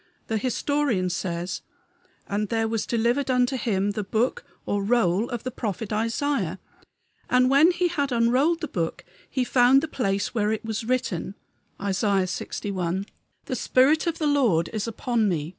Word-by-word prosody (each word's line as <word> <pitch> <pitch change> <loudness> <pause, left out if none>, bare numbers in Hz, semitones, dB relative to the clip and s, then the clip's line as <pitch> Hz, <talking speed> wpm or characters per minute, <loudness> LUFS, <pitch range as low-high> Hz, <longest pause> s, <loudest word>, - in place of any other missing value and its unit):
The 220 -1 0
historian 255 -5 0
says: 175 0 -3 0.7
"And 205 0 -2
there 225 -1 +1
was 225 -1 -2
delivered 240 +4 +1
unto 250 +1 +2
him 205 -5 0
the 210 +1 -3
book 220 +5 0 0.2
(or 200 0 -1
roll) 215 -2 +2
of 240 -2 -4
the 255 - -3
prophet 215 -3 -4
Isaiah, 225 - -1 0.7
and 255 +1 +4
when 290 +5 +6
he 355 0 +1
had 285 -5 -1
unrolled 255 +8 +2
the 310 - -2
book 170 -10 -3 0.2
he 260 - 0
found 250 +2 +5
the 320 - -3
place 200 -9 -1
where 215 -2 +1
it 220 -1 -1
is 220 0 -2
written 225 -7 -1 0.4
(Isaiah 195 0 +1
lxi.): 185 0 -3 0.4
The 260 - -3
spirit 285 +7 +3
of 335 -1 -1
the 310 - -1
Lord 245 - +2
is 215 0 -2
upon 230 -1 0
me. 155 -4 -2
230 Hz, 160 wpm, -25 LUFS, 200-255 Hz, 0.7 s, when